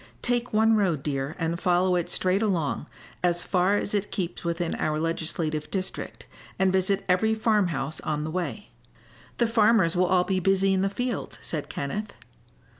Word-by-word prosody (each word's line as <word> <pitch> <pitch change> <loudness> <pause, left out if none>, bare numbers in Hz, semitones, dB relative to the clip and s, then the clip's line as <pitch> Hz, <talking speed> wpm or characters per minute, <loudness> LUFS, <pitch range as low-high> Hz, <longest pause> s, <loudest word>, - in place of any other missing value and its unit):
Take 245 0 0
one 220 +1 +4
road, 175 -9 +1
dear, 140 0 -2
and 165 0 -1
follow 180 +1 +2
it 175 -1 -1
straight 185 +3 +1
along, 170 -8 0 0.4
as 175 -1 +2
far 185 +2 +2
as 205 - -2
it 205 0 0
keeps 180 -3 -3
within 170 0 -1
our 155 0 -1
legislative 160 -1 -2
district, 190 -1 -5 0.3
and 190 -1 +2
visit 190 +1 +1
every 205 +4 +3
farm 215 -3 +2
house 140 -2 -3
on 150 -1 -2
the 155 - -4
way." 165 -9 -4 0.7
"The 240 - +3
farmers 220 -6 +3
will 180 +1 +3
all 180 -1 +3
be 190 0 0
busy 195 +1 +2
in 190 - +2
the 195 - +1
fields," 245 +4 -3
said 155 -3 -3
Kenneth. 210 +10 -4
185 Hz, 175 wpm, -26 LUFS, 165-205 Hz, 0.7 s, one